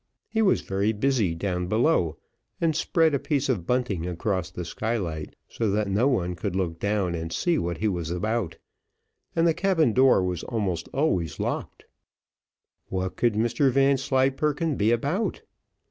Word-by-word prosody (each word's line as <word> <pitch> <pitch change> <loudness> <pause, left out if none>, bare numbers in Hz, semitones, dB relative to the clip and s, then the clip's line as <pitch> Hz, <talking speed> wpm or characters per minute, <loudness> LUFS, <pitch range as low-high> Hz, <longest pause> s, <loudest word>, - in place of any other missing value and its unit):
He 225 - 0
was 200 -3 +3
very 100 +3 0
busy 110 -6 +1
down 90 0 -2
below, 110 - +2 0.4
and 165 -3 +1
spread 160 -1 +2
a 140 - +2
piece 140 -1 -1
of 95 -10 -1
bunting 120 -9 0
across 90 +1 -2
the 90 -1 -6
skylight, 90 -6 -3
so 115 -2 -2
that 105 +1 0
no 110 +7 +3
one 90 -10 0
could 95 +1 -3
look 85 -3 -2
down 100 -3 0
and 80 0 -4
see 175 - +1
what 85 -1 -2
he 110 - 0
was 85 -5 -2
about, 95 +1 -2 0.8
and 165 - +3
the 165 - +4
cabin 165 - +2
door 130 -6 +5
was 90 -2 -2
almost 95 -8 -2
always 95 - 0
locked. - - -4 1.0
What 95 0 -3
could 120 -3 +1
Mr 120 +5 +2
Vanslyperken 135 +3 +2
be 105 -1 +2
about? 145 - -1
110 Hz, 160 wpm, -26 LUFS, 90-135 Hz, 1.0 s, door